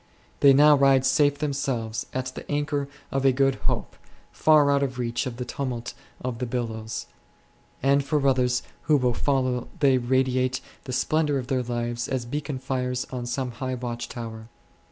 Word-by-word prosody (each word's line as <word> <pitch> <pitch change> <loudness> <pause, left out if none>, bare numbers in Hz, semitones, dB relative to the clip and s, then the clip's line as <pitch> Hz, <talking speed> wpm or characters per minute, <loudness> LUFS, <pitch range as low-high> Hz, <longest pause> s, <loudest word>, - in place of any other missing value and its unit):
They 140 - +7
now 150 +2 +7
ride 135 -1 +4
safe 145 +1 +3
themselves 135 -6 -2
at 130 0 -3
the - - -9
anchor 145 -1 -1 0.2
of 135 0 0
a 135 - +6
good 135 +1 +3 0.2
hope, - - -3 0.4
far 150 -2 +4
out 140 0 +3
of 130 -2 -2
reach 120 0 -1
of 120 -2 -6
the 125 - -4
tumult 125 -2 -4 0.3
of 125 -2 -4
the 125 - -2
billows; 115 -2 -4 0.8
and 140 +1 +4
for 140 -1 +1
others 125 -2 +2 0.2
who 150 - +4
will 125 -2 +1
follow 130 -1 0
they 135 -3 +4
radiate 130 +1 +1 0.3
the 130 - -5
splendour 145 +3 +1
of 130 - -3
their 130 -2 +1
"lives 120 -1 -3
as 130 -3 -2
beacon 145 +2 -3
fires 125 -1 -2
on 125 -2 -4
some 125 +1 -2
high 130 +2 -4
watch 120 -1 -5
tower. 110 -2 -7
130 Hz, 175 wpm, -25 LUFS, 125-140 Hz, 0.8 s, They